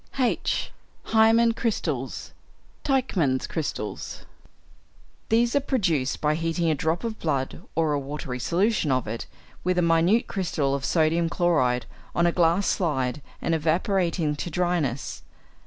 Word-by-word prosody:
(h) 255 -3 0 0.4
=Hæmin 225 +1 +5
Crystals 155 - -2 0.5
(Teichman's 195 - +1
Crystals).= 145 -9 -4 1.0
These 235 +3 +3
are - - +5
produced 185 - 0
by 150 0 +2
heating 165 +1 0
a - - +3
drop 160 - -1
of 225 -2 -4
blood, 140 -5 -2
or 160 -2 +2
a 145 - +1
watery 135 -2 -5
solution 175 - +1
of 130 -3 0
it, 115 +2 -4 0.4
with 180 0 +1
a 180 - +3
minute 170 +7 +3
crystal 160 -8 -1
of 140 -1 -2
sodium 165 0 +2
chloride 150 -9 +2 0.3
on 170 - +3
a 170 - +4
glass 170 +3 +2
slide 145 -5 0 0.2
and 165 - +1
evaporating 165 0 +1
to 175 - -4
dryness. 165 -7 -1
165 Hz, 135 wpm, -25 LUFS, 145-190 Hz, 1.0 s, =Hæmin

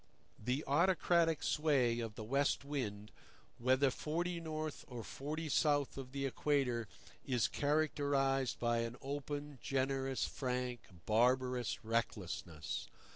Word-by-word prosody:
The 125 +6 0
autocratic 170 +1 +3
sway 135 -6 +2
of 115 -2 -4
the 110 - -6
West 140 +4 +1
Wind, 110 -8 -3 0.5
whether 130 +3 +4
forty 170 +5 -2
north 155 -2 -4
or 120 -4 -6
forty 155 +7 -4
south 145 -1 +2
of 130 -2 -7
the 140 0 -2
Equator, 130 -4 +1 0.4
is 125 -4 +2
characterized 140 -3 +1
by 120 -1 +2
an 115 +1 -2
open, 145 0 -4
generous, 135 -1 0
frank, 125 -2 -2 0.3
barbarous 125 +1 +2
recklessness. 95 -8 -2
135 Hz, 115 wpm, -36 LUFS, 120-145 Hz, 0.5 s, whether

